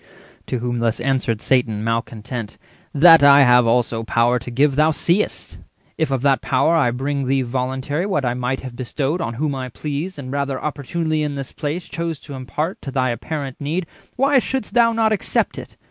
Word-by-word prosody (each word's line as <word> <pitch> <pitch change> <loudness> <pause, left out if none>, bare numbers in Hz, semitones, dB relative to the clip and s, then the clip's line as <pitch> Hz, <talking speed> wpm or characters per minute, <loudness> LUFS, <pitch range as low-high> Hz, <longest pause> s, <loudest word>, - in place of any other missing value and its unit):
To 130 - -2
whom 120 0 -2
thus 115 -1 0
answered 125 -3 0
Satan, 115 -5 +1
male 115 0 +1
content:— 115 0 -7 0.3
"That 165 +2 +7
I 140 0 +8
have 125 -1 +5
also 115 -1 +1
power 120 +2 +2
to 125 - -9
give 135 +3 +2
thou 155 +2 +4
seest; 170 +5 -1 0.4
If 160 -2 -1
of 135 -2 -1
that 140 -2 +3
power 135 +5 +2
I 150 -7 +3
bring 135 +2 -2
thee 135 0 +1
voluntary 130 +7 -2
What 150 -9 0
I 120 - +1
might 125 +1 -2
have 130 -2 -8
bestowed 135 +6 -2
on 115 -5 -3
whom 145 +3 -1
I 130 -1 -4
pleased, 150 +8 -5
And 130 -3 -7
rather 140 -1 -2
opportunely 155 +2 -2
in 150 -1 -2
this 135 -1 -6
place 155 +4 -4
Chose 165 -1 -4
to 145 - -10
impart 150 +7 -4
to - - -6
thy 130 -2 0
apparent 140 +2 -5
need, 165 +5 -2 0.3
Why 275 +1 +4
shouldst 260 -2 -3
thou 235 -1 +4
not 225 -1 +1
accept 215 - -1
it? - - -12
135 Hz, 195 wpm, -20 LUFS, 125-155 Hz, 0.4 s, I